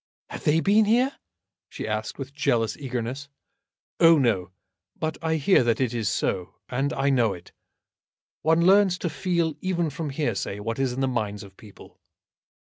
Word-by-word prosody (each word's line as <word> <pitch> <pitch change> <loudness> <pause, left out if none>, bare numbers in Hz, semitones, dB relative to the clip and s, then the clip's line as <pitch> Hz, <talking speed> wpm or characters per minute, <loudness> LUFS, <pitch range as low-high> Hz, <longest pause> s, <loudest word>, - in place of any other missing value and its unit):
"Have - - -8
they 155 +2 +3
been 210 +4 +4
here?" 250 +6 +2 0.5
she - - -6
asked, 110 0 -3
with 135 0 -7
jealous 120 -6 0
eagerness. 130 0 -5 0.7
"Oh, 165 -1 +7
no. 110 -9 +1 0.5
But 155 0 -3
I 160 0 0
hear 160 -1 +4
that 115 -1 +1
it 130 -3 0
is 115 -4 -1
so, 90 -1 -2
and 135 +3 -1
I 140 0 +1
know 120 -6 +2
it. 85 - -12 0.9
One 165 +1 +3
learns 190 -1 +5
to 170 -2 -3
feel 170 -4 0
even 175 -4 -1
from 155 +1 -4
hearsay 120 -8 -2
what 115 +4 -4
is 135 -2 +1
in 130 - -3
the 135 - +2
minds 105 -5 -2
of 95 -1 -14
people." 105 -1 -16
135 Hz, 170 wpm, -25 LUFS, 115-165 Hz, 0.9 s, Oh